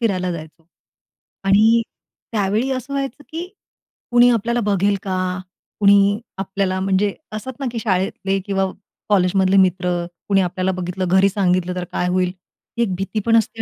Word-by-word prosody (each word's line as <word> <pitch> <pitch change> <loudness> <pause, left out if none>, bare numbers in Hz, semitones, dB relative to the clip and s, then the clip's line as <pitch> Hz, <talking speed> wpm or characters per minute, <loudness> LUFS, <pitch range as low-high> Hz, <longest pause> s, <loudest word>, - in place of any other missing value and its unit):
फिरायला 185 -6 0
जायचो. 160 0 -10 0.8
आणि 220 +4 +5 0.5
त्यावेळी 215 +5 0
असं 260 +1 -4
व्हायचं, 275 0 -3
"की 335 +3 -4 0.7
कुणी 240 0 +6
आपल्याला 235 +1 +1
बघेल 200 -1 +2
का? 185 -1 -2 0.4
कुणी 200 0 +5 0.2
आपल्याला" 190 -1 -1
म्हणजे 195 +1 +1 0.2
असतात 215 +5 -5
ना, 275 - -3
की 235 - -3
शाळेतले 195 -1 0
किंवा 195 -1 0 0.4
कॉलेजमधले 190 0 +3
मित्र, 180 -2 +2 0.2
"कुणी 195 -1 +3
आपल्याला 185 +1 -1
बघितलं, 185 0 -3
घरी 190 +2 +4
सांगितलं 185 -2 0
तर 180 - -3
काय 180 - -1
होईल?" 180 0 +1 0.5
ही 235 - +3
एक 190 -5 -1
भीती 195 +3 -3
पण 230 - +4
असते 225 0 -1
195 Hz, 150 wpm, -20 LUFS, 185-220 Hz, 0.8 s, कुणी